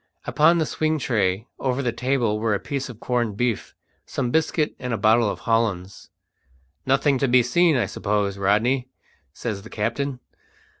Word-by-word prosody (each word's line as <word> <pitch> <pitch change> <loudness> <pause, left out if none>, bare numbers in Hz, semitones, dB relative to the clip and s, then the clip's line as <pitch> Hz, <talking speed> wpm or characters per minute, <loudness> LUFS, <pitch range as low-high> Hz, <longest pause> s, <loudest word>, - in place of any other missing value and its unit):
Upon 165 +3 +4
the 160 - +1
swing 155 +1 0
tray 105 -6 0
over 130 +1 -1
the 120 - 0
table 120 -3 0
were 110 -1 +1
a - - -2
piece 140 -1 -4
of 115 -3 -10
corned 120 -5 -1
beef, 120 -3 -2 0.3
some 125 -3 -3
biscuit, 160 0 +1
and 125 -1 -4
a - - -3
bottle 110 +2 +3
of - - -5
hollands. 105 -5 -1 0.8
"Nothing 135 0 +2
to 135 - +2
be 125 0 +5
seen, 165 +5 +3
I 120 - +1
suppose, 100 0 -1
Rodney?" 115 +7 +2 0.4
says 105 +5 -5
the 110 - -12
captain. 125 +5 -2
120 Hz, 165 wpm, -23 LUFS, 105-135 Hz, 0.8 s, be